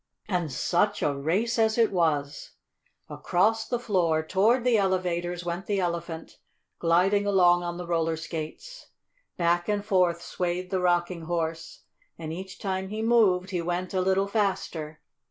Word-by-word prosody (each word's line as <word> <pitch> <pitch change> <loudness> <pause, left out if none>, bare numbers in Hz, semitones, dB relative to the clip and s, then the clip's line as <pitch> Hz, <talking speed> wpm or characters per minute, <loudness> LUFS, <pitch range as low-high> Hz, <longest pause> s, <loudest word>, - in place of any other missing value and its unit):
And 175 -7 -1
such 180 +9 0
a 145 -1 +1
race 195 - 0
as 220 0 +2
it 230 -2 +3
was! 150 -6 -1 0.5
Across 220 +5 0
the 245 - 0
floor, 175 -9 +1
toward 220 +8 +2
the 245 -2 +3
elevators, 180 -3 0
went 175 +2 -4
the 205 -2 0
Elephant, 170 -2 -4 0.4
gliding 185 +5 +2
along 175 -3 +4
on 175 0 -4
the 180 - -6
roller 165 -1 0
skates. 165 - -7 0.5
Back 175 +2 +1
and 205 -1 -1
forth 180 -4 +2
swayed 180 +1 -3
the 190 - +1
Rocking 175 -1 0
Horse, 165 -1 -3 0.4
and 160 -1 -6
each 190 +2 -8
time 190 -1 -3
he 215 +2 -4
moved 200 -6 +3
he 180 -2 -1
went 175 +2 -3
a 185 - +1
little 190 +1 +2
faster. 185 -7 -2
180 Hz, 155 wpm, -27 LUFS, 170-200 Hz, 0.5 s, along